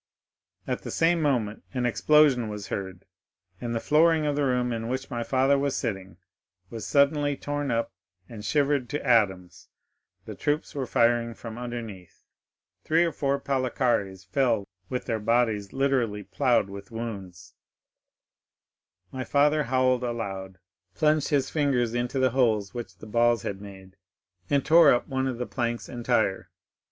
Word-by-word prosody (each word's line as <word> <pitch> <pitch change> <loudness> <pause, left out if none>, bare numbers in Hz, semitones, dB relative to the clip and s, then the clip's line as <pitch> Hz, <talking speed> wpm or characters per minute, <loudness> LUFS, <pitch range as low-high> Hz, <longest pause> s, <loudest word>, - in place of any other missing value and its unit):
At - - -3
the - - -7
same 165 0 +2
moment 120 -8 0
an 125 -1 0
explosion 135 -1 +3
was 105 -1 -7
heard, 95 -2 -5 0.6
and 120 -1 -3
the - - 0
flooring 155 +3 +3
of 145 -1 0
the 145 - 0
room 125 -2 0
in 115 0 -4
which 130 +2 -4
my 120 -2 -2
father 135 +3 +2
was 140 -1 -1
sitting 95 -6 -4 0.5
was 115 -2 -6
suddenly 145 0 +2
torn 145 0 -3
up 115 0 -1 0.4
and 110 -3 -9
shivered 140 +1 +1
to 145 -1 -4
atoms—the 95 -8 -2
troops 150 +1 -1
were 135 -3 -3
firing 115 0 +2
from 115 0 -8
underneath. 115 -7 -8 0.6
Three 165 +2 +3
or 165 - -1
four 140 -1 -1
Palikares 125 -8 -1
fell 115 -2 0 0.2
with 125 - -3
their 115 -2 -1
bodies 110 -2 +1
literally 130 -6 0
ploughed 100 +3 +1
with 100 0 -10
wounds. 100 -6 -7 1.6
"My 130 -1 -4
father 145 +3 +2
howled 130 0 +2
aloud, 95 -6 -4 0.4
plunged 155 -1 +2
his 140 -3 0
fingers 130 -6 +1
into 120 +2 -2
the 130 -1 +3
holes 110 -6 +1
which 120 -2 -7
the - - -12
balls 120 0 +2
had 100 -1 -4
made, 95 -1 -12 0.5
and 140 -1 +1
tore 165 -2 +7
up 120 - +1
one 130 -1 -1
of 130 -2 -3
the 125 - -3
planks 120 -2 -3
entire. 120 -5 -1
120 Hz, 150 wpm, -26 LUFS, 110-140 Hz, 1.6 s, tore